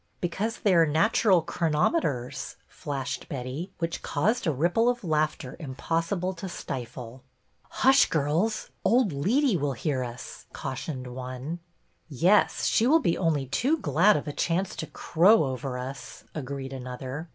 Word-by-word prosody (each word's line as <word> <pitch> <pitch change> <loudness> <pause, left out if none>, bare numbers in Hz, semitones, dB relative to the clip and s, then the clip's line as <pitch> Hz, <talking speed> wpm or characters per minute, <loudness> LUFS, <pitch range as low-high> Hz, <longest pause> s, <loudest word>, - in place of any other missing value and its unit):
" - - -43
Because 200 +6 -2
they 200 - +3
are 165 -2 +5
natural 180 +3 +3
chronometers," 150 - -1
flashed 140 -3 -5
Betty, 140 +6 -5
which 165 0 -3
caused 195 +8 0
a - - +3
ripple 175 - +2
of 245 -2 -2
laughter 155 -5 -1
impossible 165 +6 -2
to 185 +1 -7
stifle. 125 -4 -7 0.3
" - - -43 0.2
Hush, 265 +1 +6
girls. 165 +9 0
Old 235 -4 +3
Leetey 210 - +2
will 145 -1 0
hear 130 +1 -1
us," 120 0 -9
cautioned 135 -1 -5
one. 130 +5 -6 0.3
" - - -43 0.2
Yes, 175 +9 +3
she 230 - +3
will 320 +5 +6
be 170 - +1
only 155 -6 0
too 250 - +1
glad 180 - +3
of 150 - -5
a 145 - -3
chance 180 +5 -1
to - - -4
crow 185 +5 +4
over 130 -1 -3
us," 130 +2 -7
agreed 135 -2 -5
another. 130 +4 -6
155 Hz, 150 wpm, -27 LUFS, 135-190 Hz, 0.3 s, Hush